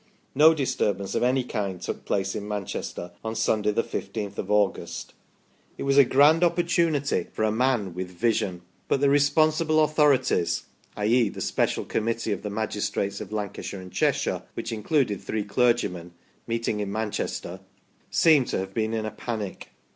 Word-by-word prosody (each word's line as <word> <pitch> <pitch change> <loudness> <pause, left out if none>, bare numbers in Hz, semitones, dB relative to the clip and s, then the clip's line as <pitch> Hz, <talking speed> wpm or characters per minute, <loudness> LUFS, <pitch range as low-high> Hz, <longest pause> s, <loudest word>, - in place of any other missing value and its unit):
No 155 +4 +6
disturbance 105 -8 -1
of - - 0
any 125 +1 +2
kind 100 -6 -3
took - - -5
place 95 -1 -1
in 105 -1 -5
Manchester 100 -3 -5
on 110 0 -3
Sunday, 105 -1 +1
the 105 +2 +1
1 - - -3
5th 100 -3 -6
of 100 - -4
August. 105 -2 0 0.6
It - - -4
was 140 0 +4
a - - +10
grand 145 +6 +5
opportunity 170 -4 +1
for - - -2
a 110 - +2
man 115 -5 +1
with 90 +1 -5
vision; 90 -2 -1 0.2
but - - +1
the 140 0 +3
re 145 - +5
sponsible 155 +2 +3
authorities 150 - +2 0.3
i.e. 110 +2 +3
the - - -9
special - - 0
Committee 115 0 -1
of 100 - -2
the 105 - -4
magistrates 100 -1 -2
of 105 - -8
Lancashire 105 -2 -4
and 90 0 -10
Cheshire - - 0
(which 115 - -4
included 110 - 0
three 110 -1 -2
clergymen) 100 -6 0 0.3
meeting 115 -2 -1
in 100 -1 -3
Manchester 105 -3 -3 0.5
seem 155 -5 +5
to - - -2
have 95 +1 -4
been 110 +1 -1
in 110 -1 -2
a 110 - -3
panic. 110 -2 -5
110 Hz, 170 wpm, -26 LUFS, 100-135 Hz, 0.6 s, a